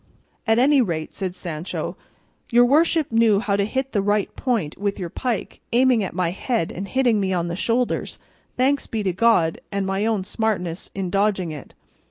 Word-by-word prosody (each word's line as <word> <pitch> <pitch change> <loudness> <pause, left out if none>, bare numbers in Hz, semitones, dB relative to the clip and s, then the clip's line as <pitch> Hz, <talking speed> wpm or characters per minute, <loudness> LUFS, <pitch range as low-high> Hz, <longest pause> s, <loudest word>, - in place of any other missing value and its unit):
"At 225 0 +4
any 275 +2 +5
rate," 165 -8 -2
said 185 -2 -4
Sancho, 170 -2 -5 0.5
"your 240 0 +5
worship 310 +2 +3
knew 225 -3 +4
how 205 -2 0
to 200 0 +1
hit 265 +5 -2
the 205 - +1
right 205 0 0
point 225 - -1
with 200 0 -1
your 175 -3 -5
pike, 245 -5 -3
aiming 250 -2 +4
at 185 - -5
my 180 -2 0
head 210 -1 -1
and 195 +3 -5
hitting 245 -4 +2
me 190 -1 0
on 175 -1 -1
the 170 - -3
shoulders, 235 +5 -1 0.4
thanks 275 +2 +1
be 220 -3 -3
to 190 -2 0
God 185 -5 +2
and 200 -1 -1
my 195 +3 0
own 215 -4 0
smartness 185 -5 -2
in 190 -2 -3
dodging 195 -4 +1
it. 150 -3 -10
205 Hz, 190 wpm, -22 LUFS, 185-240 Hz, 0.5 s, any